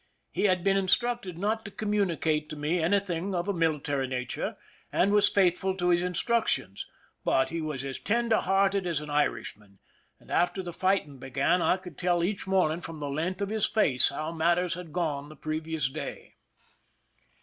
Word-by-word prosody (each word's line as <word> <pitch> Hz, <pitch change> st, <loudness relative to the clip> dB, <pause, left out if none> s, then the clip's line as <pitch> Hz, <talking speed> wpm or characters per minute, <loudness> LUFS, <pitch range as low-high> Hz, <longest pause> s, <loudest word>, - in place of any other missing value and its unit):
He -, -, 0 dB
had 185 Hz, -3 st, +2 dB
been 195 Hz, 0 st, +3 dB
instructed 195 Hz, -1 st, +1 dB
not 215 Hz, +4 st, -1 dB
to -, -, -7 dB
communicate 180 Hz, -8 st, 0 dB
to 155 Hz, -, -5 dB
me 150 Hz, +4 st, 0 dB
any 175 Hz, +5 st, +3 dB
thing 185 Hz, 0 st, -3 dB
of 175 Hz, +2 st, -1 dB
a 200 Hz, -, +1 dB
military 150 Hz, -5 st, 0 dB
nature, 125 Hz, -1 st, -3 dB, 0.3 s
and 195 Hz, -, +2 dB
was 205 Hz, 0 st, +5 dB
faithful 190 Hz, 0 st, +2 dB
to 180 Hz, -1 st, +1 dB
his 175 Hz, 0 st, +4 dB
instructions; 180 Hz, -, 0 dB, 0.4 s
but 130 Hz, -, +2 dB
he 165 Hz, 0 st, -3 dB
was 150 Hz, -4 st, -4 dB
as 135 Hz, -1 st, -4 dB
tender 230 Hz, 0 st, +2 dB
hearted 195 Hz, 0 st, +2 dB
as 165 Hz, -4 st, 0 dB
an 150 Hz, 0 st, -7 dB
Irishman, 105 Hz, -8 st, -2 dB, 0.4 s
and -, -, -16 dB
after 180 Hz, +2 st, +1 dB
the 175 Hz, -1 st, -6 dB
fighting 185 Hz, -7 st, 0 dB
began, 135 Hz, +7 st, +1 dB
I 185 Hz, -, +3 dB
could 180 Hz, -5 st, -11 dB
tell 175 Hz, -1 st, +2 dB
each 195 Hz, +2 st, -2 dB
morning 180 Hz, -4 st, +2 dB
from 165 Hz, -2 st, -7 dB
the 145 Hz, -1 st, -4 dB
length 175 Hz, +7 st, -2 dB
of 200 Hz, -, -2 dB
his 215 Hz, -1 st, +1 dB
face 145 Hz, -, +4 dB
how 155 Hz, +3 st, -4 dB
matters 170 Hz, +2 st, +1 dB
had 175 Hz, -2 st, -7 dB
gone 150 Hz, -4 st, -2 dB
the 155 Hz, -, -11 dB
previous 155 Hz, -1 st, -2 dB
day. 150 Hz, +4 st, -7 dB
175 Hz, 180 wpm, -28 LUFS, 155-195 Hz, 0.4 s, was